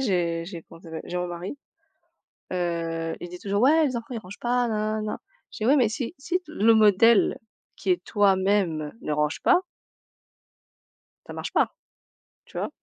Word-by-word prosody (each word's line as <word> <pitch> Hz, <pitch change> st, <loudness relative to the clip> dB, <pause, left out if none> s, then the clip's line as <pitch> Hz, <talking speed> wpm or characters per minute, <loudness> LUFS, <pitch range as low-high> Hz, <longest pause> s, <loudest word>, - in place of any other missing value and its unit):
j'ai 170 Hz, -7 st, 0 dB
j'ai 170 Hz, -2 st, -8 dB
comment 165 Hz, -, -15 dB
ça 165 Hz, -, -13 dB
s'appelle, 160 Hz, -, -6 dB
j'ai 180 Hz, -, -3 dB
mon 180 Hz, -, -1 dB
mari, 175 Hz, +7 st, -6 dB, 1.0 s
heu, 165 Hz, -2 st, -2 dB
il 175 Hz, -, -6 dB
dit 180 Hz, +1 st, -9 dB
toujours: 200 Hz, +3 st, -1 dB
«Ouais, 310 Hz, +4 st, +5 dB
les 255 Hz, -3 st, -2 dB
enfants, 230 Hz, -, -5 dB
ils 240 Hz, -, -3 dB
rangent 195 Hz, -2 st, -11 dB
pas», 245 Hz, 0 st, +1 dB
nananana. 215 Hz, -1 st, -2 dB, 0.3 s
Je -, -, -10 dB
dis: 215 Hz, -, -1 dB
«Ouais, 275 Hz, +4 st, +5 dB
mais 245 Hz, -6 st, +4 dB
si 235 Hz, +7 st, -4 dB
si 340 Hz, +6 st, -1 dB
t 310 Hz, -4 st, -14 dB
le 225 Hz, -5 st, +4 dB
modèle 220 Hz, +1 st, +5 dB, 0.4 s
qui -, -, -2 dB
est 360 Hz, -, +1 dB
toi 200 Hz, -2 st, +3 dB
même 185 Hz, -6 st, 0 dB
ne 150 Hz, -, -3 dB
range 150 Hz, 0 st, 0 dB
pas» 360 Hz, -, +4 dB, 1.6 s
«ça -, -, -9 dB
marche -, -, -5 dB
pas, -, -, +2 dB, 0.7 s
tu -, -, -11 dB
vois?» -, -, -2 dB
205 Hz, 185 wpm, -25 LUFS, 175-235 Hz, 1.6 s, Ouais